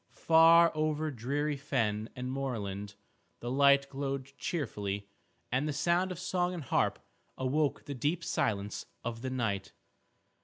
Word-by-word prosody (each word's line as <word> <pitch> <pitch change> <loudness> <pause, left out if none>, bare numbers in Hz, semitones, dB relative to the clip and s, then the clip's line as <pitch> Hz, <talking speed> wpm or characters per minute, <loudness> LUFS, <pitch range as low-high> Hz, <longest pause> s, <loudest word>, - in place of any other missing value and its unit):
Far 165 +1 +7
over 155 0 0
dreary 140 +4 -1
fen 115 -7 -1
and 125 0 -4
moorland 105 -7 -4 0.4
the 120 - -4
light 140 +1 +5
glowed 140 0 -4
cheerfully, 100 - -3 0.4
and 130 +5 +1
the 150 - -1
sound 175 +5 +1
of 180 - -5
song 180 0 -1
and 165 - -5
harp - - +1 0.4
awoke 140 +3 0
the 145 - -4
deep 150 +7 -1
silence 100 -8 -1 0.2
of 115 -1 -4
the 130 - -3
night. 105 -7 -2
135 Hz, 140 wpm, -31 LUFS, 115-155 Hz, 0.4 s, Far